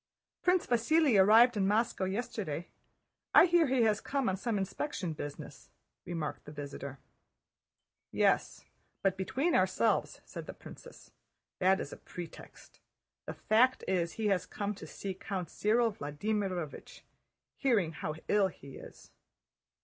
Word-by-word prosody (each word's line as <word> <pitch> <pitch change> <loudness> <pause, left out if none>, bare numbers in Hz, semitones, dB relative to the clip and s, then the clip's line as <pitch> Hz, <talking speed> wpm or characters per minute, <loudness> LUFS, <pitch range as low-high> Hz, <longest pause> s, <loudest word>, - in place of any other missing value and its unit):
"Prince 365 -1 +3
Vasíli 245 -1 +4
arrived 230 +4 +6
in 195 -2 +1
Moscow 210 -2 +1
yesterday. 190 -5 -3 0.7
I - - +10
hear 345 -3 +4
he 255 -2 +2
has 215 -2 +2
come 275 -5 -1
on 190 - 0
some 215 +2 -2
inspection 195 - -3
business," 145 -1 -8 0.4
remarked 165 -3 -4
the - - -9
visitor. 140 -2 -7 1.1
"Yes, - - +1 0.4
but 195 -1 +2
between 265 - -1
ourselves," 185 +4 +1
said - - -8
the - - -7
princess, - - -13 0.5
"that 190 +1 +4
is 140 - -5
a - - -9
pretext. 175 -2 -11 0.5
The - - -5
fact 250 +4 +3
is 175 -3 0
he 220 - -4
has 195 -2 +1
come 205 0 -3
to 200 - -10
see 195 -1 -5
Count 190 -3 -5
Cyril 225 +2 +2
Vladímirovich, 180 +1 -4 0.6
hearing 220 - +2
how 155 0 -5
ill 205 -2 +3
he 140 -7 -11
is." - - -13
200 Hz, 135 wpm, -32 LUFS, 175-235 Hz, 1.1 s, I